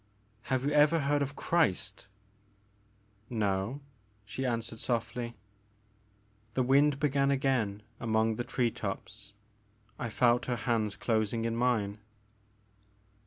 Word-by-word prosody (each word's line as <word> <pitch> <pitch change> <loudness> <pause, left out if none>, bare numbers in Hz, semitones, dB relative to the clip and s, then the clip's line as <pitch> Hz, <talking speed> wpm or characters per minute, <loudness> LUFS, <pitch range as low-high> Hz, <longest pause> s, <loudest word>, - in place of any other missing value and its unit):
*' 105 +1 -37
Have 130 0 +1
you 145 - +1
ever 150 +2 +5
heard 145 +1 +1
of 140 0 -2
Christ? 100 - 0 0.6
" 105 +1 -37 0.2
No," 100 +8 -1 0.4
she 105 +6 -3
answered 115 -1 -3
softly. 120 0 -2 1.2
The 130 - +2
wind 140 +2 +4
began 140 -1 +2
again 130 -7 +1 0.2
among 110 -1 +1
the 120 - -1
tree 120 -1 0
tops. 105 0 -6 0.7
I 120 - -2
felt 120 +2 +3
her 125 - 0
hands 110 -4 +1
closing 110 +1 0
in 115 0 -1
mine. 110 -4 +1
115 Hz, 120 wpm, -31 LUFS, 105-130 Hz, 1.2 s, ever